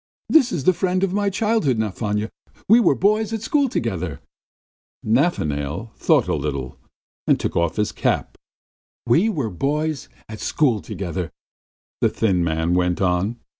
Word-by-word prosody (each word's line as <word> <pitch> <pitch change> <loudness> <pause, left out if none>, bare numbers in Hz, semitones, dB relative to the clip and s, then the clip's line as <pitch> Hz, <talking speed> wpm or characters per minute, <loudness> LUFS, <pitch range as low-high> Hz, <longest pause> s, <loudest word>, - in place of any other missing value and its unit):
This 270 -6 +5
is 150 - -2
the 185 - +4
friend 185 +1 0
of 190 -1 0
my 205 0 +1
childhood, 205 - +1
Nafanya. 105 0 -2 0.4
We 225 +4 +7
were 235 - +4
boys 215 +2 +1
at 225 -1 -3
school 285 +2 +2
together!" 90 - -3 0.9
Nafanail 100 - 0
thought - - +2
a - - 0
little 70 -3 -3 0.5
and - - +4
took - - -3
off 85 -1 +1
his 105 -1 0
cap. - - -1 0.7
"We 165 - +3
were 140 - -2
boys 150 - -2 0.2
at 110 -1 -8
school 125 -9 +1
together," 90 +1 -4 0.7
the - - +4
thin 95 -6 +1
man 80 +1 0
went 90 -1 +1
on. 95 +5 0
115 Hz, 150 wpm, -22 LUFS, -, 0.9 s, We